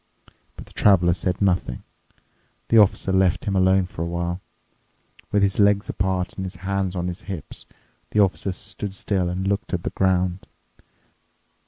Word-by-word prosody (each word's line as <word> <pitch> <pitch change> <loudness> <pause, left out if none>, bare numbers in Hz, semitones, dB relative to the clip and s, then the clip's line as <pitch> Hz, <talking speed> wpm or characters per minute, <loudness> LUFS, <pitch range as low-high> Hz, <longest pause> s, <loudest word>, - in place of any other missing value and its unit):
But - - -10
the - - -19
Traveler 90 -4 +4
said 90 +2 -2
nothing. 90 -10 0 0.9
The 115 - +6
Officer 100 -1 +3
left 95 -2 +2
him 100 - -1
alone 95 0 +4
for 85 -2 -8
a 85 - -1
while. 85 +1 -3 0.9
With 100 -1 +3
his 100 0 +1
legs 100 0 +3
apart 95 -1 -1
and 95 - -3
his 95 0 -6
hands 95 0 -2
on 90 0 -2
his 90 +3 -5
hips, 85 -7 -7 0.4
the 105 - 0
Officer 95 -1 +2
stood 95 +2 -7
still 95 -3 -1
and 95 +2 -3
looked 100 -1 -1
at 85 - -5
the - - -3
ground. 95 -1 0
95 Hz, 165 wpm, -23 LUFS, 90-100 Hz, 0.9 s, The